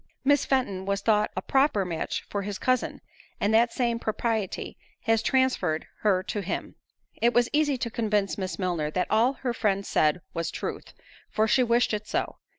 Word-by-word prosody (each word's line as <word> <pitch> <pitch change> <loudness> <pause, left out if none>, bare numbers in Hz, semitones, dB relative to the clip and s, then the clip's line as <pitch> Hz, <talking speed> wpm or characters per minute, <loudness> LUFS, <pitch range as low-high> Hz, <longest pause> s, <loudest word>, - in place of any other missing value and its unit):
Miss 285 0 +4
Fenton 200 -8 0
was 200 0 0
thought 210 0 +3
a 185 - -2
proper 265 -8 +2
match 165 -3 -3
for 200 - -3
his 200 0 -4
cousin, 255 -2 0 0.4
and 205 +2 +1
that 230 +1 +4
same 235 -2 0
propriety 220 -3 -2 0.3
has 225 -2 +2
transferred 260 -13 +1
her 190 -3 +2
to 205 - -3
him." 195 - -4 0.5
It 235 +1 +3
was 240 0 +4
easy 295 -2 +2
to 235 -1 -3
convince 210 -3 0
Miss 185 -4 -4
Milner 175 -5 -1
that 180 +4 -2
all 230 +5 +4
her 255 -3 -3
friend 200 -3 0
said 155 +3 +2
was 165 0 -2
truth, - - -6 0.3
for 220 +1 +1
she 255 - +4
wished 235 -1 +2
it 210 0 -3
so. - - -2
215 Hz, 180 wpm, -27 LUFS, 195-240 Hz, 0.5 s, Miss